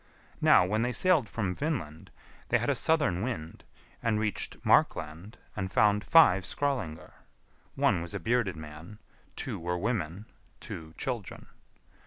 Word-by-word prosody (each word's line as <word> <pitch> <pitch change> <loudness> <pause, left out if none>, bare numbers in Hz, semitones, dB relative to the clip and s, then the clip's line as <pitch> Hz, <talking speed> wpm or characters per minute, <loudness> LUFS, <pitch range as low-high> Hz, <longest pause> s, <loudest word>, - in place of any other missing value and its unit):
Now, 90 - +6
when 105 +4 0
they 125 +1 0
sailed 165 - +3
from 100 -5 -2
Vinland, 90 - -4 0.4
they - - +4
had - - 0
a - - +3
southern 145 - +1
wind, 105 -9 -5 0.4
and 110 -2 +1
reached 105 -2 -2
Markland, 85 +8 +1 0.2
and 95 -2 -3
found 105 -3 +3
five 100 - +6
Skrœlingar; 120 - -3 0.6
one - - +2
was 85 0 -6
a - - -2
bearded 115 -6 0
man, 80 +5 -10 0.4
two - - -4
were 90 +1 -2
women, 100 -2 -2 0.3
two 80 0 -8
children. 120 -7 -4
105 Hz, 140 wpm, -29 LUFS, 85-120 Hz, 0.6 s, Now